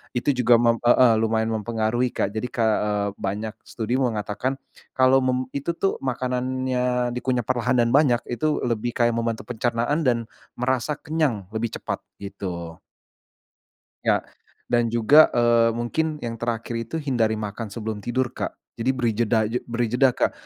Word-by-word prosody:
itu 125 +4 +2
juga 125 -2 +4
mem 115 0 +3
heeh, 120 0 +5
lumayan 110 0 +1
mempengaruhi 115 +2 -1
Kak 100 - 0
jadi 110 +4 -3
Kak, 115 -2 +1 0.2
eee, 105 -1 0
banyak 105 +3 -3
studi 120 +3 -2
mengatakan, 115 +1 -1 0.4
kalau 130 +1 +5
mem 130 -1 +1
itu 140 +5 -3
tuh 195 +3 -1
makanannya 125 -1 -1
dikunyah 125 0 -1
perlahan 120 +1 0
dan 120 -1 +3
banyak 130 -4 +4
itu 150 +6 0
lebih 120 0 -1
kayak 120 -1 +3
membantu 115 -1 -2
pencernaan 120 +5 -1
dan, 120 -2 +3 0.4
merasa 130 +3 0
kenyang 150 -11 -1
lebih 110 +1 -3
cepat - - -4 0.2
gitu. 85 -4 -6 1.3
Ya, - - +3 0.5
dan 120 -1 +2
juga, 120 +7 +6
eee, 120 -1 +4
mungkin 150 +7 -2
yang 115 -1 -4
terakhir 115 0 -3
itu 115 +6 -5
hindari 120 -6 +1
makan 105 +1 -5
sebelum 110 -2 -4
tidur 125 +1 0
Kak, - - -4 0.2
jadi 120 +3 +1
beri 125 -3 0
jeda 115 0 +2
aj 120 - 0
beri 120 0 -1
jeda 125 +2 +3
Kak, - - +1
120 Hz, 155 wpm, -24 LUFS, 115-130 Hz, 1.3 s, juga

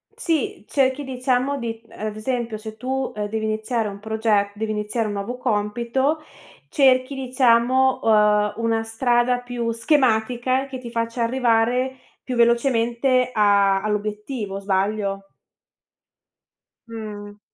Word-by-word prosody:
Sì, 310 - -2
cerchi 270 0 +1
diciamo 255 +1 0
di 230 -2 -5
ad 215 0 -5
esempio 235 -1 -3
se 220 0 -8
tu, 260 +2 -3
ehm, 210 -1 -3
devi 220 0 -2
iniziare 220 +1 -1
un 200 0 -7
proge 215 -2 0
devi 215 +1 -3
iniziare 215 +1 -2
un 205 - -3
nuovo 205 +5 -4
compito, 240 +6 0 0.5
cerchi, 265 -1 +3
diciamo, 255 0 +3
uhm, 210 -1 +4
una 225 -1 0
strada 240 +2 +1
più 245 -2 -3
schematica 250 0 +1
che 265 -1 -6
ti 235 -2 -9
faccia 230 0 -2
arrivare 250 +1 +1 0.3
più 255 - -4
velocemente 240 +1 +2
a 200 -2 +3
all'obiettivo, 210 0 -3
sbaglio? 195 0 -1 1.6
Mh. 210 -2 -8
230 Hz, 120 wpm, -22 LUFS, 215-255 Hz, 1.6 s, uhm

